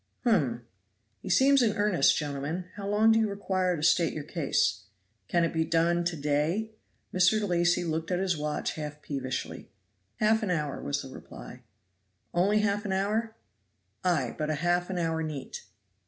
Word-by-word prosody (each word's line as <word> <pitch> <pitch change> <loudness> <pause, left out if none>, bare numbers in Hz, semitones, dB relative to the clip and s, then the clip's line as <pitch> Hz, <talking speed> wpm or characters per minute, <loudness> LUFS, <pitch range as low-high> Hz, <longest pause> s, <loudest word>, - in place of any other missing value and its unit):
"Hum! 140 - +1 0.6
he 195 - -8
seems 270 +8 +5
in 220 -2 +1
earnest, 205 -8 +3
gentlemen. 150 +4 -3
How 200 -1 -6
long 215 +2 +4
do 225 - +4
you 220 -1 +1
require 185 -3 -1
to 150 - -5
state 165 +1 +3
your 155 - -5
case? 140 - 0 0.4
Can 170 -1 +2
it 165 - 0
be 160 -1 +1
done 170 +1 +2
to 175 -1 -1
day?" 150 +9 0 0.4
Mr. 205 +4 +3
Lacy 175 0 +2
looked 160 -1 -2
at 180 - +1
his 185 -1 0
watch 150 0 -2
half 150 -1 -7
peevishly. 130 -3 -4 0.5
"Half 220 +1 +2
an 210 - -2
hour," 150 -5 -2
was 140 0 -2
the 135 - -9
reply. - - -11 0.7
"Only 200 +5 +3
half 205 -1 0
an 200 -3 -2
hour?" 215 +4 -1 0.7
"Ay, 155 -10 +1
but 155 0 -1
half 175 +4 0
an 190 - -3
hour 165 -1 0
neat." 155 -4 -6
175 Hz, 170 wpm, -28 LUFS, 150-200 Hz, 0.7 s, seems